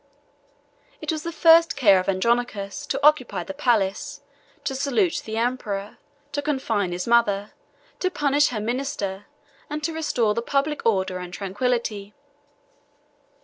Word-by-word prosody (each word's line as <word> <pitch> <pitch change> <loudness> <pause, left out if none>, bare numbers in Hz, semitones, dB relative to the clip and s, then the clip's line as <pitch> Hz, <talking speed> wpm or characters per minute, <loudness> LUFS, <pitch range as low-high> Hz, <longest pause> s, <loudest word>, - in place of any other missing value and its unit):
It - - -2
was 310 -1 -3
the 335 - -4
first 330 0 +5
care 205 -9 +5
of 185 - -2
Andronicus 205 0 -1
to 275 - -1
occupy 300 -5 +3
the 290 - -7
palace, 230 -9 0 0.4
to 285 - -2
salute 280 +6 +1
the 220 0 -4
emperor, 225 -4 -2 0.3
to 290 - -2
confine 235 -10 -1
his 175 +1 -3
mother, 215 -4 +2 0.5
to 370 - +1
punish 290 -4 +2
her 230 - -3
minister, 215 -4 -3 0.4
and 300 +1 -4
to 330 - -1
restore 250 -9 +1
the 230 - -1
public 280 +2 -1
order 190 -4 +1
and 180 -1 -7
tranquillity. 205 +1 -2
235 Hz, 140 wpm, -24 LUFS, 200-290 Hz, 0.5 s, first